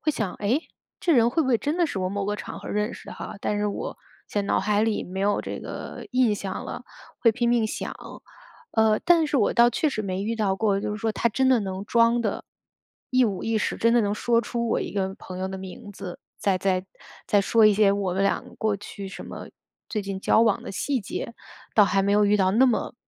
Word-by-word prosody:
会 305 - +1
想： 210 -8 -2
“诶？ 230 +9 +2 0.4
这 340 - +2
人 235 -2 +5
会 295 - +1
不 265 - -2
会 240 - +4
真 295 +7 -2
的 345 - +3
是 205 - -4
我 185 0 -1
某 200 0 -2
个 210 0 -1
场 - - -7
合 - - -8
认 210 +1 -1
识 - - -10
哈？ - - -7
但 210 - -1
是 210 - 0
我 205 - -4 0.3
现 205 -1 -1
脑 - - +2
海 210 +1 +1
里 220 -1 0
没 185 +2 -7
有 205 +1 +2
这 - - -5
个 - - -7
印 250 -4 +3
象 195 -2 -5
了。” - - -7 0.4
会 230 - +5
拼 240 +1 0
命 235 -2 +3
想。 - - -4 0.8
呃， 220 -1 +3
但 335 -2 +5
是 295 - 0
我 215 - +3
倒 235 0 +6
确 275 +6 +1
实 270 - -3
没 190 -2 -3
遇 225 +2 -2
到 200 -3 +1
过， 200 -1 +1
就 - - -3
是 210 - -3
说 225 0 -1
他 225 +3 +1
真 260 +5 +1
的 255 -2 +5
能 190 0 -4
装 230 +1 +3
得 210 -3 -2 0.7
一 255 -1 +4
五 200 -4 -2
一 225 -1 0
十 - - -1
真 230 +1 +3
的 240 - +5
能 205 -1 0
说 230 +2 +2
出 235 0 -3
我 - - +1
一 - - -4
个 190 -1 -1
朋 185 -1 -8
友 190 0 -2
的 190 0 -6
名 190 +3 -9
字， 185 -3 -8 0.2
再 195 -2 +1
再 185 0 0 0.4
再 205 - +4
说 220 +2 +4
一 210 - +5
些 205 -1 +4
我 195 -2 0
们 195 - +1
俩 195 - +2 0.2
过 215 -2 +1
去 200 -1 -8
什 - - -9
么 - - -8 0.4
最 215 - -2
近 195 -1 -5
交 220 - +4
往 220 -3 +2
的 - - -7
细 260 +7 -1
节， 225 +3 -5 0.4
倒 210 - +7
还 195 0 +2
没 200 +1 +1
有 210 0 +4
遇 205 +1 +4
到 190 -1 +2
那 235 +6 +5
么 245 -4 0
210 Hz, 265 characters per minute, -25 LUFS, 195-235 Hz, 0.8 s, 倒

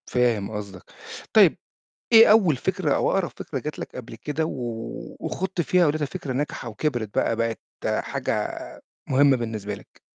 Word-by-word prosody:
فاهم 120 -5 +1
قصدك. 100 -3 -7 0.5
طيب - - +6 0.5
إيه 225 -2 +9
أول 195 -9 +5
فكرة 175 +1 0
أو - - +2
أقرب 190 -3 +1
فكرة 135 - -4
جات 150 +4 -6
لك - - -7
قبل 120 -2 -8
كده 150 +7 -2
و 115 -6 -5
وخُضت 190 -1 -2
فيها 180 +2 +3
ولقيتها 150 0 0
فكرة 135 -1 -5
ناجحة 135 -3 -3
وكبرِت 115 -3 -2
بقى 115 - +2
بقت 115 0 -1 0.4
حاجة - - -3 0.4
مهمة 140 0 +5
بالنسبة 110 -4 -4
لك؟ - - -16
130 Hz, 155 wpm, -24 LUFS, 115-155 Hz, 0.5 s, إيه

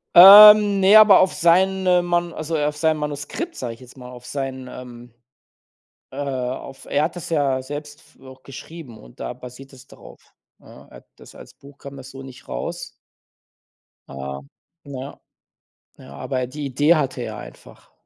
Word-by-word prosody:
Ähm, 205 +2 +9
ne, 195 +2 +4
aber 210 -3 +7
auf 185 - +1
seine 185 +1 +1
Man 175 -1 -2
also 155 +1 -5
auf 150 0 -2
seinem 160 0 0
Manuskript, 150 - -6
sage 120 -2 -7
ich - - -24
jetzt 125 0 -17
mal, 125 -1 -12
auf 125 -1 -14
sein, 135 -2 -6
ähm 120 -1 -13 1.0
äh 135 - -11
auf 130 0 -6
er 145 - -1
hat 165 - -5
das 175 - -9
ja 140 -5 -1
selbst 145 +2 -9
f - - -27
auch 130 0 -16
geschrieben 135 -3 -12
und - - -19
da - - -5
basiert 125 +2 -14
das 130 +1 -17
darauf, - - -17 0.4
ja? - - -18
Er - - -16
hat - - -21
das - - -17
als - - -15
Buch 140 0 -19
kam 140 0 -12
das 135 0 -12
so 135 0 -11
nicht 130 -2 -14
raus. - - -6 1.2
Ah, 70 0 -8 0.4
ja. 140 0 -10 0.8
Ja, 70 - -15
aber 125 - -5
die 145 +3 -8
Idee 145 +6 +2
hatte 130 -4 -3
er - - -7
einfach. - - -15
140 Hz, 175 wpm, -20 LUFS, 130-170 Hz, 1.2 s, Ähm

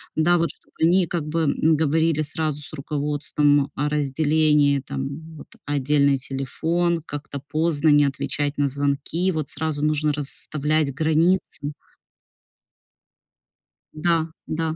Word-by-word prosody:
да, 175 +3 +3
вот, 170 0 +1
чтобы - - -31
они 175 +2 +4
как 165 -2 -3
бы, 165 +2 -1
м, 140 -2 +1 0.2
говорили 160 +1 +2
сразу 150 -1 -3
с 145 - -10
руководством 145 0 0
о 145 +1 0
разделении 150 0 +2
там, 140 +4 -6
вот - - -11 0.2
отдельный 140 0 +2
телефон, 165 +6 -1
как-то 145 -2 -6
поздно 155 -1 +1
не 145 -1 +6
отвечать 140 +1 -2
на 145 -1 +2
звонки, 145 +6 -1
вот 155 -5 -3
сразу 155 -1 -3
нужно 150 0 +1
расставлять 150 0 -1
границы. 155 0 +1 2.2
Да, 165 0 +1 0.2
да. 160 0 -2
150 Hz, 120 wpm, -23 LUFS, 145-160 Hz, 2.2 s, не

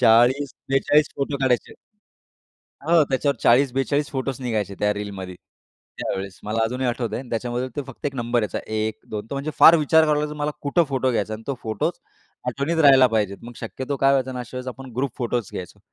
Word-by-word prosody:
40-42 135 +4 +3
photo 140 +1 -1
काढायचे. 125 -2 +1 1.1
हो, 165 -1 +5
त्याच्यावर 135 +1 +1
40-42 135 +3 +3
फोटोज 135 -1 -3
निघायचे 110 -5 -2
त्या 105 0 +2
रीलमध्ये, 100 -3 -6 0.6
त्यावेळेस. 95 0 -4
मला 115 +2 0
अजूनही 125 +3 -1
आठवतंय 120 -2 -2
आणि 130 - -10
त्याच्यामधलं 120 +2 -2
ते 145 - -1
फक्त 135 - -10
एक 140 - -2
नंबर 120 -1 0
यायचा 105 - -2 0.2
1 110 0 -1
2, 105 -1 -4
तो 140 - -4
म्हणजे 140 +3 -3
फार 165 - +10
विचार 160 +1 +4
करावा 150 -1 +3
लागायचा 150 0 -3
मला 150 +1 0
कुठं 150 +4 +2
फोटो 130 -1 +1
घ्यायचा 110 -2 -1
आणि 110 +1 -7
तो 140 - -1
फोटो 110 -1 0 0.6
आठवणीत 150 +4 -1
राहायला 135 -4 +7
पाहिजे. 105 -4 0
मग 120 +1 -9
शक्यतो 130 +4 -4
काय 135 0 +4
व्हायचं 130 -1 +1
ना, 125 - -5
अशा 125 +1 -7
वेळेस 125 0 -6
आपण 130 0 -7
ग्रुप 135 0 -1
फोटोज 120 -3 -2
घ्यायचो. 90 - -7
130 Hz, 190 wpm, -23 LUFS, 115-140 Hz, 1.1 s, फार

